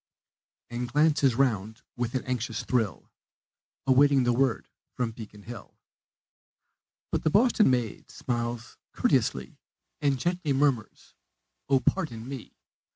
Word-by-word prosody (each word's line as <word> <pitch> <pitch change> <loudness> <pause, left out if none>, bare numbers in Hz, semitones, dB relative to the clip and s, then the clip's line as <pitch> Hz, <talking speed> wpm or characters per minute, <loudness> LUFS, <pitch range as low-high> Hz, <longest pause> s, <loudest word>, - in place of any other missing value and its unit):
And 120 0 -4
glances 145 -4 +3
round 110 -4 0
with 120 +1 -3
an 130 - 0
anxious 125 -2 -3
thrill, 115 -7 -1 0.7
Awaiting 135 0 +5
the 120 0 +2
word 130 -2 +1 0.3
of 120 -3 -1
Beacon 105 -2 -11
Hill. 115 -1 -10 1.3
But - - 0
the - - +3
Boston 215 - +4
maid 120 -4 -1
smiles 120 -1 -4 0.2
courteouslee 65 0 +1 0.4
And 140 -2 +2
gently 175 0 -1
murmurs, 135 -5 0 0.6
"Oh, 135 -1 +4
pardon 125 -12 -1
me! 135 -4 -8
125 Hz, 115 wpm, -28 LUFS, 115-140 Hz, 1.3 s, Awaiting